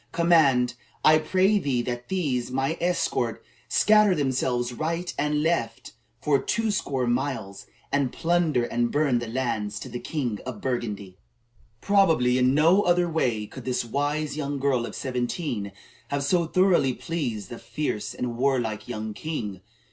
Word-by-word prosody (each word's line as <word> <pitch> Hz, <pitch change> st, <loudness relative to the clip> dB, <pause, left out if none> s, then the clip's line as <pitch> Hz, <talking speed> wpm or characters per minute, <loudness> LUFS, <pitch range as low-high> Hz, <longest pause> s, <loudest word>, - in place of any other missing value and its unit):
Command, 145 Hz, -8 st, +4 dB, 0.3 s
I 155 Hz, 0 st, +7 dB
pray 190 Hz, +6 st, +2 dB
thee, 130 Hz, -8 st, 0 dB
that 120 Hz, 0 st, -5 dB
these, 140 Hz, -10 st, -1 dB
my 135 Hz, +4 st, -1 dB
escort, 175 Hz, +1 st, -1 dB, 0.2 s
scatter 210 Hz, -3 st, +5 dB
themselves 125 Hz, -4 st, 0 dB
right 165 Hz, +6 st, -2 dB
and 150 Hz, +1 st, 0 dB
left 115 Hz, -9 st, -1 dB, 0.3 s
for 140 Hz, -3 st, +2 dB
twoscore 205 Hz, -, -1 dB
miles, 120 Hz, -5 st, -2 dB, 0.2 s
and 140 Hz, -3 st, +1 dB
plunder 165 Hz, -7 st, +1 dB
and 120 Hz, 0 st, 0 dB
burn 145 Hz, -5 st, +2 dB
the 120 Hz, -, -5 dB
lands 110 Hz, -4 st, -2 dB
of -, -, -9 dB
the 120 Hz, -, -4 dB
king 125 Hz, -10 st, -3 dB
of 125 Hz, -5 st, -6 dB
Burgundy." 105 Hz, -7 st, -4 dB, 0.6 s
Probably 160 Hz, -11 st, +3 dB
in 130 Hz, +2 st, +3 dB
no 165 Hz, +7 st, +5 dB
other 175 Hz, -2 st, +2 dB
way 125 Hz, -10 st, 0 dB
could -, -, -10 dB
this 125 Hz, -2 st, -1 dB
wise 145 Hz, +4 st, -1 dB
young 145 Hz, -1 st, -3 dB
girl 130 Hz, -3 st, +1 dB
of -, -, -8 dB
seventeen 125 Hz, -, -3 dB, 0.4 s
have 140 Hz, 0 st, -2 dB
so 170 Hz, +3 st, +2 dB
thoroughly 175 Hz, -7 st, +3 dB
pleased 120 Hz, -, -4 dB
the 120 Hz, -, -7 dB
fierce 150 Hz, -8 st, -3 dB
and 120 Hz, -1 st, -3 dB
warlike 120 Hz, -5 st, 0 dB
young 110 Hz, -3 st, -4 dB
king. 105 Hz, -, -5 dB
135 Hz, 150 wpm, -25 LUFS, 120-160 Hz, 0.6 s, I